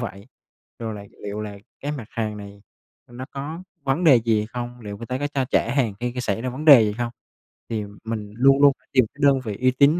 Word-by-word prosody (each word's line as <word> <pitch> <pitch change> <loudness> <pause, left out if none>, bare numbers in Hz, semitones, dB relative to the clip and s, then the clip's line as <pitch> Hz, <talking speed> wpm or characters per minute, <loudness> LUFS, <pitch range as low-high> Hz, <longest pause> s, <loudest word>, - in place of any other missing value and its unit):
vậy? 100 -3 -6 0.5
Rồi 110 -2 -4
là 100 -1 -8 0.2
liệu 105 +1 -4
là 105 -1 -6 0.2
cái 145 +1 -3
mặt 135 -6 -5
hàng 110 -2 -3
này 100 0 -10 0.5
nó 120 +2 -7
có 150 +5 -5 0.2
vấn 135 +6 0
đề 145 -6 +8
gì 110 -2 +2
không? 120 +1 -6
Liệu 105 -2 -7
người 115 - -8
ta 130 +1 -2
có 145 - -1
cho 140 -2 -1
trả 120 -1 +1
hàng 120 -7 +1
khi 120 0 -2
xảy 110 -2 -2
ra 130 - -2
vấn 135 +5 -6
đề 140 -7 +10
gì 105 - 0
không? 120 -1 -2 0.6
Thì 110 -2 -2 0.2
mình 110 -2 -4
luôn 135 +3 +5
luôn 140 -1 +8
phải - - -36
tìm 130 -2 +5
cái 140 - -17
đơn 135 -1 +5
vị 105 -3 -4
uy 130 0 +4
tín, 140 +2 +5
120 Hz, 240 wpm, -23 LUFS, 105-135 Hz, 0.6 s, đề